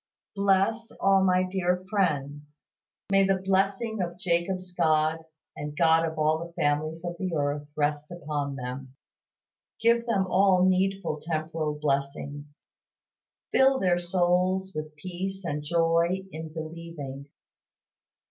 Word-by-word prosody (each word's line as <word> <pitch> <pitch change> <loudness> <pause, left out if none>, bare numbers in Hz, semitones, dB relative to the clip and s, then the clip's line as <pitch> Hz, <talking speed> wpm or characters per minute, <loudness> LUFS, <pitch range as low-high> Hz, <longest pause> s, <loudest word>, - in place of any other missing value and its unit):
Bless 200 +3 +2
all 195 -1 +4
my 185 -1 +3
dear 185 -1 -1
friends; 150 -7 -2 0.5
may 195 0 +5
the 195 0 +3
blessing 195 +3 0
of 175 -1 -3
Jacob's 180 +1 -1
God, 155 -2 +2 0.4
the 150 0 -5
God 160 0 +4
of 160 -1 -6
all 155 +1 +2
the 170 +1 -7
families 155 +3 -1
of 175 0 -3
the 185 -3 -2
earth, 145 0 -1
rest 150 +1 -1
upon 145 -5 -3
them. 130 +1 -6 0.8
Give 235 +1 +3
them 200 -5 +2
all 185 -1 +4
needful 190 -3 +1
temporal 155 -1 -2
blessings. 145 0 -3 0.9
Fill 265 0 +5
their 180 -2 +2
souls 180 +2 +1
with 155 0 -6
peace 185 +4 -5
and 150 -2 -2
joy 170 +3 +1
in 160 0 -7
believing. 155 -4 -7
170 Hz, 125 wpm, -27 LUFS, 150-190 Hz, 0.9 s, may